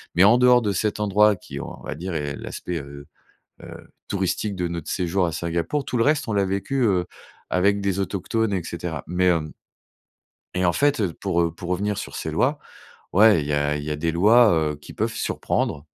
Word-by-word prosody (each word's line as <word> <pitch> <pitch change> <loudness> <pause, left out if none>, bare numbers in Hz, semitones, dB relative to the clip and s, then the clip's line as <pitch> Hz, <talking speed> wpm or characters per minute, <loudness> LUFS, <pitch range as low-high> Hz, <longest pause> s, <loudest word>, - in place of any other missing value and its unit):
Mais 90 - +6
en 110 +5 +6
dehors 125 -1 +5
de 105 -2 0
cet 105 +3 -1
endroit 105 +1 +4
qui, 90 - -9
on - - -8
va - - -5
dire, 90 +3 -5
est 75 -3 -3
l'aspect, 90 -2 -5
heu 70 0 -10 0.6
heu, - - -11 0.2
touristique 100 +1 -1
de 90 - -1
notre 85 -2 -5
séjour 90 0 0
à 85 - -2
Singapour, 85 - -2
tout 125 - -3
le 115 - +3
reste, 145 0 +2
on 110 - -2
l'a 100 -1 +2
vécu, 100 +8 -1
heu, 95 -6 +2 0.5
avec 100 +3 +2
des 100 -1 -1
autochtones, 100 +3 -1
et 90 -3 -1
cetera. 85 -3 -5
Mais, 90 +2 0
hem 80 -4 +1 1.0
et 90 0 +1
en 85 - +3
fait, 145 - +2
heu, 90 -5 -1
pour, 85 - -1
heu, 85 -1 0
pour 85 - -8
revenir 100 +3 -1
sur - - -6
ces - - -4
lois, - - +1 0.5
ouais, 105 -3 +6
il 70 - -5
y 75 - -1
a 75 0 +1
il 75 - -6
y 75 - -4
a - - -1
des 80 +2 -1
lois, 110 +6 +5 0.2
heu, - - -7
qui 75 - -13
peuvent - - -2
surprendre. 75 +1 -2
90 Hz, 220 wpm, -23 LUFS, 85-105 Hz, 1.0 s, Mais